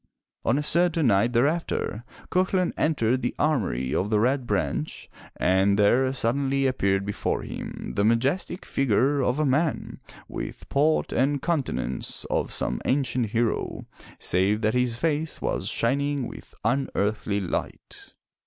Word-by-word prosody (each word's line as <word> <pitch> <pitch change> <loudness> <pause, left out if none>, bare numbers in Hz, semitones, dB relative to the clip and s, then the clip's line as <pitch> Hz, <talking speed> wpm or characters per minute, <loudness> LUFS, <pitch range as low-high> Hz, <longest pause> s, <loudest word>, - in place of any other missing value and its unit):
On - - +2
a 150 - -1
certain 170 0 +2
night 115 +1 +3
thereafter, 135 -3 0 0.3
Cuchulain 185 -1 +1
entered 130 -5 +1
the 120 - -2
armory 95 - 0
of 100 - 0
the 105 -1 +2
Red 125 +2 +1
Branch 75 - -2 0.3
and 95 +2 +3
there 125 +6 +4
suddenly 135 +2 0
appeared 100 -7 +1
before 105 - -2
him - - -6
the 100 - +2
majestic 135 - +1
figure 135 +2 +2
of 125 +1 +1
a 155 - +1
man 145 +3 0 0.3
with - - -7
port 150 +3 +2
and 140 +3 +2
countenance 140 - -2
of - - 0
some - - -1
ancient 130 -3 +1
hero, 115 +2 -1 0.3
save 100 +4 +1
that 110 -1 +1
his 125 -2 +1
face 155 +3 -1
was - - -2
shining 140 +2 0
with - - -12
unearthly 110 -5 0
light. 95 -4 -5
130 Hz, 135 wpm, -25 LUFS, 105-145 Hz, 0.3 s, there